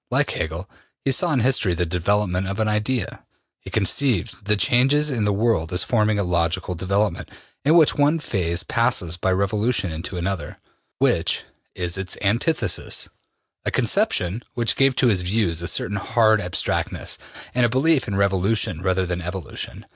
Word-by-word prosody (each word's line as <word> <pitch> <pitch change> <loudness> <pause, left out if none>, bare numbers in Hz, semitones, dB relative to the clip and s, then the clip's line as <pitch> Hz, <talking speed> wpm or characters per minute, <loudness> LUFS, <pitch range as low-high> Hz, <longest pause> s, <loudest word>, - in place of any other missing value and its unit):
Like - - +1
Hegel, 80 +4 -4 0.4
he 135 - +2
saw 170 +6 +2
in 135 -5 +2
history 110 -7 +2
the 90 +1 0
development 90 +2 0
of 100 +2 -4
an 110 - +1
Idea. 105 +2 -1 0.4
He - - -10
conceived 110 -2 0
the 105 +1 +3
changes 135 +10 +3
in 115 -5 0
the 105 - +2
world 100 -5 +1
as 90 - +1
forming 110 -3 +1
a 100 - +1
logical 85 0 0
development, 95 +1 -1 0.3
in 150 +4 +4
which 160 -3 +6
one 145 +3 +2
phase 90 - -2
passes 115 -9 0
by 90 +2 0
revolution 100 +1 0
into 85 +4 -6
another, 90 +1 -3 0.4
which - - +1 0.3
is 90 0 -2
its 95 -1 -3
antithesis 115 +11 0 0.5
a - - 0
conception 90 +7 +1
which 120 -2 +1
gave 135 -1 +3
to 125 - +3
his 100 -6 +2
views 90 -3 0
a 85 - -2
certain 100 - -1
hard 110 +1 +3
abstractness, 90 -2 -2 0.3
and 125 - +2
a 120 - +4
belief 140 +4 +2
in 100 - -2
revolution 95 -2 +1
rather 95 0 +1
than 90 0 -3
evolution. 90 -2 -6
100 Hz, 165 wpm, -22 LUFS, 90-120 Hz, 0.5 s, which